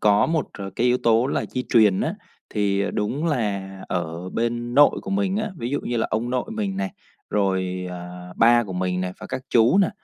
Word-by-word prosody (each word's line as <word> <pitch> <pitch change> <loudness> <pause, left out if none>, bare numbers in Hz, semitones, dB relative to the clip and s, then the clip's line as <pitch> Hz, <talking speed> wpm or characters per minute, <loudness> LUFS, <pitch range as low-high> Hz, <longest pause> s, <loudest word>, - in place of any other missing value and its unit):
có 105 -1 +4
một 160 -4 0
c - - -9 0.2
cái 120 - +2
yếu 125 +1 +3
tố 115 +1 +3
là - - -1
di 125 - -2
truyền 105 -5 +5
á, - - -1 0.4
thì, 100 -1 +1
ờ, 100 - 0
đúng 135 +10 -1
là 105 -10 -1 0.2
ở 85 0 -3
bên 120 +1 -2
nội 145 +1 +6
của - - -6
mình 195 0 +1
á, 215 0 -1
ví 120 -2 -4
dụ 145 - 0
như 120 - -3
là 115 - +1
ông 115 +3 -1
nội 125 -1 0
mình 210 -3 -2
này, 195 0 -2 0.4
rồi, 95 -2 0
ờ, 90 0 -8
ba 120 +1 +5
của 95 - -7
mình 90 0 -1
này, 90 0 -2
và - - -7
các 130 - -4
chú 120 - +5
này 195 - +4
115 Hz, 225 wpm, -23 LUFS, 95-130 Hz, 0.4 s, nội